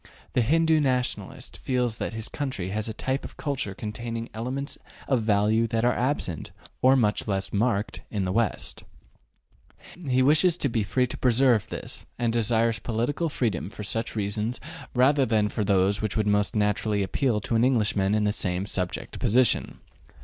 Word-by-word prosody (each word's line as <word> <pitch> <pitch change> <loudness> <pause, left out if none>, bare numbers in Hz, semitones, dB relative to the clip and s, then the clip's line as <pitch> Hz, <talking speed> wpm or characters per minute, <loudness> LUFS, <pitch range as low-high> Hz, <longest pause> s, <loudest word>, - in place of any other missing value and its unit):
The 125 - +3
Hindoo 160 +5 +3
Nationalist 125 -3 -2
feels 125 -3 -1
that - - -3
his 110 0 -2
country 130 -11 -4
has 110 +3 -2
a - - -2
type 130 +5 -2
of - - -9
culture 135 -10 -3
containing 115 +2 -5
elements 130 +6 -4 0.3
of 130 -4 +2
value 110 +1 +2
that 115 0 0
are 125 - +4
absent, 125 - -2 0.3
or 130 +1 +6
much 110 -5 +1
less 95 -2 -1
marked, 105 -1 0
in 100 -3 -2
the 90 - -1
West; 115 +1 -1 1.3
he 130 0 +3
wishes 155 +5 +4
to 140 - +1
be 115 -1 0
free 125 +5 +1
to 125 - -6
preserve 125 -3 +3
this, - - -5
and 120 -2 0
desires 115 0 +2
political 120 +10 -1
freedom 110 - -1
for 105 - -8
such 115 +3 -2
reasons 105 +3 -2 0.4
rather 135 +3 +4
than 110 -4 +2
for 105 - -2
those 100 +1 +2
that 110 -1 -2
would 110 - +1
most 105 0 +1
naturally 105 0 +1
appeal 115 +3 0
to 100 - -3
an 115 - +3
Englishman 105 -5 +2
in 105 - +1
the 105 0 +1
same 90 -2 -1
subject 90 -3 -3
position. 125 +2 +2
115 Hz, 170 wpm, -26 LUFS, 105-125 Hz, 1.3 s, or